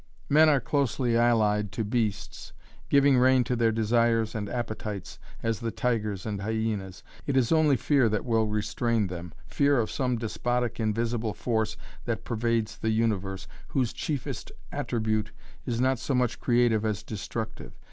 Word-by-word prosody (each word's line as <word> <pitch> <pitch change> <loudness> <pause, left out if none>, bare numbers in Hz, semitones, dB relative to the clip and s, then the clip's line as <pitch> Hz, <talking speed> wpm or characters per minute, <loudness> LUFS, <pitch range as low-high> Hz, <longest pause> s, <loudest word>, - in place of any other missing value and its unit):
"Men 155 +2 +6
are 145 -2 +4
closely 130 -2 0
allied 105 -3 +2
to 115 - -1
beasts, 105 -2 -2 0.4
giving 140 -2 +5
rein 130 0 +5
to 125 0 -1
their 115 -1 +3
desires 115 0 +2
and 105 -2 -4
appetites 110 -5 -5 0.2
as 115 -3 0
the 115 - -2
tigers 110 -5 -1
and 105 -3 -3
hyenas. 105 -3 -3 0.2
It 140 -2 +1
is 125 -3 +2
only 155 -4 +4
fear 130 -1 +3
that 105 +1 -1
will 110 -2 +2
restrain 110 +1 0
them, 90 -2 -6
fear 140 -2 +2
of 110 - -1
some 125 -2 0
despotic 120 +1 -2
invisible 115 0 -1
force 110 -2 -1 0.3
that 115 -1 -2
pervades 115 -1 -1
the 110 - -1
universe, 100 -4 0 0.2
whose 125 -5 0
chiefest 145 -5 -4 0.2
attribute 110 -2 -1 0.4
is 120 -2 -1
not 130 0 +2
so 130 +2 -1
much 125 -1 0
creative 120 -3 +2
as 105 -4 -1
destructive. 110 +1 -6
115 Hz, 155 wpm, -27 LUFS, 110-125 Hz, 0.4 s, Men